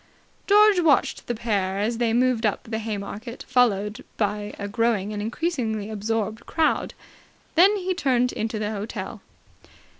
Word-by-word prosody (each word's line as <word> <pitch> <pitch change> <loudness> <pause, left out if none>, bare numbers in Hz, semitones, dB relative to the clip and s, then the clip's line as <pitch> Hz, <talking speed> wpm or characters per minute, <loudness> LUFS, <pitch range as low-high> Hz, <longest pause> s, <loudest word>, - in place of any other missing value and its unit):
George 415 -1 +6
watched 320 -5 +2
the 240 - -1
pair 200 -4 -1
as 225 +3 -1
they 235 -2 +2
moved 245 0 +2
up 210 -3 0
the 220 0 -4
Haymarket, 220 +2 -6
followed 230 -2 +1
by 210 -1 -1
a 200 - -4
growing 215 -1 0
and 205 - -3
increasingly 225 -4 -2
absorbed 220 +1 -2
crowd; 320 -1 0 0.6
then 380 +5 +6
he 375 -1 -1
turned 250 -7 +1
into 220 0 -3
the 210 0 -2
hotel. 210 +1 -5
225 Hz, 145 wpm, -24 LUFS, 210-255 Hz, 0.6 s, George